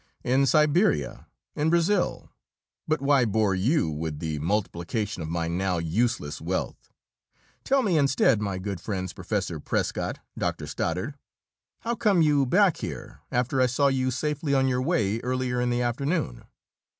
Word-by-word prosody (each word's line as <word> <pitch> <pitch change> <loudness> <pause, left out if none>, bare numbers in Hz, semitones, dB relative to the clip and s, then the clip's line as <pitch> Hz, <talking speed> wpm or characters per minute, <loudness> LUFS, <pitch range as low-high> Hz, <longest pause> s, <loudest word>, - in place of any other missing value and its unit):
"In 135 +2 +3
Siberia, 150 - +2 0.3
in 150 +2 +1
Brazil 170 +3 +1 0.6
but 155 -2 0
why 140 -2 +4
bore 110 -3 +1
you 115 - +2
with 80 0 -3
the 75 -1 -3
multiplication 100 +3 -2
of 80 - -5
my 85 0 -1
now 90 +2 0
useless 85 -2 -1
wealth? - - -3 0.7
Tell 270 0 +2
me, 180 -8 +2
instead, 135 -5 +3
my 100 -2 -2
good 95 -2 -5
friends 95 -3 -4
Professor - - -3
Prescott, - - -2 0.2
Doctor - - -2
Stoddard 95 - -3 0.6
how 235 - -1
come 205 -7 +3
you 145 -3 +3
back 185 +3 +4
here, - - -7
after 125 +2 +1
I 130 - +5
saw 140 +3 +2
you 130 -1 0
safely 145 +3 -1
on 135 0 +3
your 125 -1 +1
way 115 - +1
earlier 125 0 -1
in 125 - +1
the 120 0 0
afternoon?" 120 - -2
125 Hz, 150 wpm, -26 LUFS, 95-145 Hz, 0.7 s, I